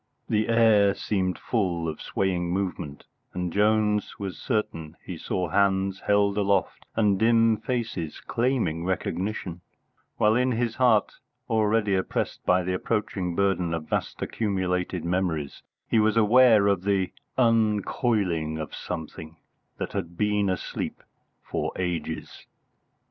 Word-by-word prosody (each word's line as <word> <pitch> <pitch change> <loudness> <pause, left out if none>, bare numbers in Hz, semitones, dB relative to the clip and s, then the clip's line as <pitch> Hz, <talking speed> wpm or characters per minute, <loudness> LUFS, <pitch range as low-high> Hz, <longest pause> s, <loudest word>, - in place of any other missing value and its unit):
The 110 0 +1
air 110 -3 +5
seemed 95 -3 -1
full 90 -8 -1
of 80 - -5
swaying 90 -3 -1
movement, 90 -6 -3 0.3
and 90 -2 -2
Jones 105 0 +2
was 100 -2 -5
certain 85 - -3
he 90 - -5
saw 90 +2 -2
hands 95 +1 +1
held 100 0 +3
aloft 100 -2 0
and 105 -3 +2
dim 115 -1 +4
faces 115 -10 -3
claiming 115 -10 -1
recognition, 95 0 -3 0.6
while 105 +1 +4
in 125 +1 +2
his 115 0 -1
heart, 120 -5 +3 0.3
already 110 -1 +2
oppressed 95 -1 -2
by 90 0 +4
the 90 +1 -1
approaching 95 -3 -2
burden 95 -3 +1
of 80 -1 -6
vast - - -2
accumulated 90 -4 -1
memories, 85 -5 -1 0.3
he 115 - +3
was 110 +1 +2
aware 115 -1 +6
of 100 -3 +2
the 95 -1 0 0.3
uncoiling 105 - +1
of 80 -2 -6
something 80 0 -7 0.4
that - - -4
had 85 -4 -4
been 105 -1 +1
asleep 95 - -4 0.4
for - - -3
ages. 90 -2 -4
100 Hz, 125 wpm, -26 LUFS, 90-110 Hz, 0.6 s, aware